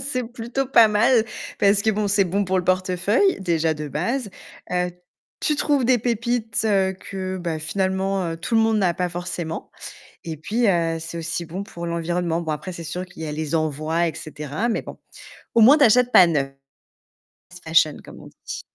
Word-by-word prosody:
c'est 270 Hz, -2 st, -2 dB
plutôt 240 Hz, +3 st, -4 dB
pas 235 Hz, -3 st, +6 dB
mal 220 Hz, +2 st, +3 dB, 0.3 s
parce 200 Hz, 0 st, +4 dB
que 220 Hz, -, +3 dB
bon, 210 Hz, 0 st, -1 dB
c'est 200 Hz, 0 st, +3 dB
bon 195 Hz, +3 st, 0 dB
pour 190 Hz, 0 st, 0 dB
le 180 Hz, -, -2 dB
portefeuille, 185 Hz, -, +1 dB
déjà 165 Hz, -3 st, +1 dB
de 150 Hz, 0 st, -6 dB
base. 205 Hz, -, -2 dB, 0.4 s
Heu, 180 Hz, 0 st, 0 dB, 0.5 s
tu 300 Hz, -, +2 dB
trouves 285 Hz, -5 st, +2 dB
des 250 Hz, 0 st, +4 dB
pépites 230 Hz, -1 st, -1 dB, 0.4 s
que, 190 Hz, -1 st, -5 dB
bah, 170 Hz, -3 st, -3 dB
finalement, 190 Hz, +3 st, -1 dB
heu, -, -, -5 dB
tout 170 Hz, +8 st, -4 dB
le -, -, +5 dB
monde 220 Hz, -1 st, +2 dB
n'a 180 Hz, -3 st, +2 dB
pas 180 Hz, +1 st, -1 dB
forcément 175 Hz, -1 st, -5 dB, 0.5 s
et 160 Hz, -2 st, -5 dB
puis, 220 Hz, +11 st, -1 dB
heu, 165 Hz, -3 st, +1 dB
c'est 165 Hz, +1 st, -6 dB
aussi 165 Hz, +1 st, -3 dB
bon 175 Hz, +4 st, -6 dB
pour 170 Hz, -3 st, -8 dB
l'environnement. 170 Hz, 0 st, -1 dB
Bon 160 Hz, -, -4 dB
après, 155 Hz, +5 st, -4 dB
c'est 170 Hz, -, -7 dB
sûr 180 Hz, +3 st, -4 dB
qu'il 180 Hz, -2 st, -11 dB
y 160 Hz, -, -4 dB
a 150 Hz, -, -4 dB
les 155 Hz, 0 st, -3 dB
envois, 155 Hz, +2 st, 0 dB
et 160 Hz, -, -5 dB
cetera. 150 Hz, +8 st, -4 dB
Mais 230 Hz, -, -1 dB
bon, -, -, -10 dB, 0.6 s
au 230 Hz, -, +6 dB
moins 265 Hz, +7 st, +8 dB
tu 295 Hz, -, +4 dB
achètes 250 Hz, +1 st, +4 dB
pas 185 Hz, -, +9 dB
neuf. 145 Hz, -5 st, 0 dB, 1.2 s
Fashion 160 Hz, -2 st, +3 dB
comme -, -, -12 dB
on -, -, -12 dB, 0.2 s
dit. -, -, -5 dB
185 Hz, 195 wpm, -22 LUFS, 165-220 Hz, 1.2 s, pas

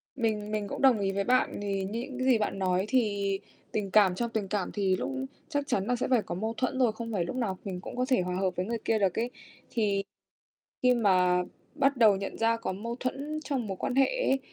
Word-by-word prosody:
Mình 215 Hz, -4 st, -1 dB
mình 210 Hz, -1 st, -1 dB
cũng -, -, -5 dB
đồng 260 Hz, -6 st, +5 dB
ý 195 Hz, -1 st, 0 dB
với 200 Hz, 0 st, 0 dB
bạn. 255 Hz, -2 st, +2 dB
Thì 195 Hz, -1 st, -1 dB
như 215 Hz, +5 st, -3 dB
những 255 Hz, -1 st, -5 dB
gì 255 Hz, -3 st, +5 dB
bạn 210 Hz, -2 st, -2 dB
nói 185 Hz, +1 st, +1 dB
thì 205 Hz, -6 st, +1 dB, 0.3 s
tình 200 Hz, -3 st, -2 dB
cảm 195 Hz, -4 st, +5 dB
trong 235 Hz, +2 st, -1 dB
tình 220 Hz, -4 st, -2 dB
cảm 195 Hz, -1 st, -2 dB
thì 195 Hz, -3 st, +1 dB
lúc -, -, -3 dB, 0.4 s
chắc 285 Hz, -2 st, -1 dB
chắn 195 Hz, 0 st, 0 dB
là 245 Hz, -, +2 dB
sẽ 245 Hz, -, -1 dB
phải 245 Hz, -4 st, +4 dB
có 175 Hz, -, -5 dB
mâu 220 Hz, +4 st, -2 dB
thuẫn 260 Hz, 0 st, -1 dB
rồi, 240 Hz, -4 st, +4 dB
không 230 Hz, +1 st, -6 dB
phải 175 Hz, -4 st, 0 dB
lúc 215 Hz, -, -5 dB
nào 205 Hz, -7 st, -1 dB
mình 180 Hz, -2 st, -4 dB
cũng -, -, -8 dB
có 250 Hz, 0 st, +1 dB
thể 255 Hz, -8 st, +4 dB
hòa 180 Hz, 0 st, -2 dB
hợp 185 Hz, -1 st, 0 dB
với 180 Hz, -, -1 dB
người 230 Hz, +1 st, -2 dB
kia 220 Hz, -1 st, +2 dB
được 195 Hz, +1 st, +1 dB
ấy. 240 Hz, +2 st, 0 dB, 0.4 s
Thì 200 Hz, -3 st, +1 dB, 0.8 s
khi 250 Hz, 0 st, +6 dB
mà 180 Hz, -5 st, +3 dB, 0.3 s
bắt 275 Hz, -2 st, +2 dB
đầu 215 Hz, -4 st, +6 dB
nhận 195 Hz, 0 st, -5 dB
ra 230 Hz, 0 st, +2 dB
có 190 Hz, -, -3 dB
mâu 230 Hz, +5 st, -5 dB
thuẫn 285 Hz, +4 st, -3 dB
trong 260 Hz, -7 st, -2 dB
mối 190 Hz, -1 st, -4 dB
quan 250 Hz, -, -2 dB
hệ 270 Hz, 0 st, +6 dB, 0.2 s
ấy, 270 Hz, -, +3 dB
215 Hz, 250 wpm, -29 LUFS, 195-245 Hz, 0.8 s, khi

